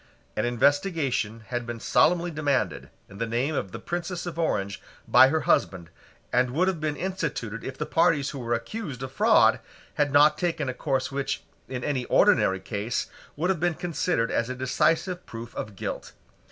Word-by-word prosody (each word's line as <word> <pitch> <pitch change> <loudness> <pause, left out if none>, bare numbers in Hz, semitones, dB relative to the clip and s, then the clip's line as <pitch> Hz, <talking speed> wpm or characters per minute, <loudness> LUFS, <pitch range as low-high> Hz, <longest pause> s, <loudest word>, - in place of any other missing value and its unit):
An 110 - 0
investigation 135 - +1
had 120 -1 -3
been 120 -1 -5
solemnly 175 +8 +3
demanded, 145 -4 -1 0.2
in 100 - -13
the 115 - -1
name 120 +7 0
of 100 -9 -2
the - - -6
Princess 175 +7 -4
of 170 -1 -5
Orange, 100 -11 -1 0.3
by 130 - +8
her 155 +3 +1
husband, 85 -3 +1 0.4
and 125 0 +3
would 165 +9 +1
have 190 -4 0
been 155 -1 -1
instituted 145 - -3
if 130 0 -6
the - - -2
parties 165 -4 +2
who 140 - -7
were 120 -1 0
accused 135 - -5
of 130 - -5
fraud - - +4 0.3
had 145 -1 +1
not 145 +2 +5
taken 165 -5 -1
a - - -2
course 135 0 -1
which, 140 0 -2 0.2
in 125 -2 -5
any 135 -4 -1
ordinary 95 0 +4
case, 100 +5 -3 0.2
would 175 +6 +1
have 180 - -2
been 175 0 +1
considered 170 -8 -1
as 115 +1 0
a 130 - -3
decisive 160 +8 0
proof 115 +1 -8
of 105 -2 -6
guilt. - - -5
135 Hz, 180 wpm, -26 LUFS, 115-165 Hz, 0.4 s, by